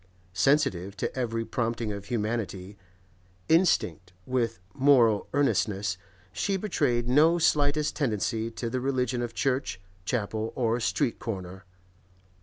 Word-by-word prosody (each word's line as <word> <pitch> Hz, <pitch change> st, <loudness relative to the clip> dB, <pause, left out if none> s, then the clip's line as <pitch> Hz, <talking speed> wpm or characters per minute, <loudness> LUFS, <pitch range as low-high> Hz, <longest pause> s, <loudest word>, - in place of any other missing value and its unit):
Sensitive 100 Hz, -, +1 dB
to -, -, -3 dB
every 115 Hz, -3 st, -2 dB
prompting 115 Hz, -1 st, -2 dB
of 100 Hz, 0 st, -7 dB
humanity, 105 Hz, -4 st, -3 dB, 0.7 s
instinct 160 Hz, -, +2 dB
with 120 Hz, -5 st, -1 dB
moral 120 Hz, -7 st, +4 dB
earnestness, 105 Hz, -8 st, +1 dB, 0.4 s
she 195 Hz, -, 0 dB
betrayed 140 Hz, -, 0 dB
no 155 Hz, +7 st, +5 dB
slightest 150 Hz, -2 st, +2 dB
tendency 115 Hz, -4 st, -1 dB
to 115 Hz, +1 st, -5 dB
the 125 Hz, +2 st, -2 dB
religion 125 Hz, -2 st, 0 dB
of 120 Hz, -1 st, -4 dB
church, 130 Hz, -7 st, -1 dB, 0.2 s
chapel, 110 Hz, +1 st, -2 dB
or 115 Hz, -1 st, +1 dB
street 100 Hz, +1 st, 0 dB
corner. 95 Hz, -3 st, -6 dB
115 Hz, 115 wpm, -27 LUFS, 105-135 Hz, 0.7 s, no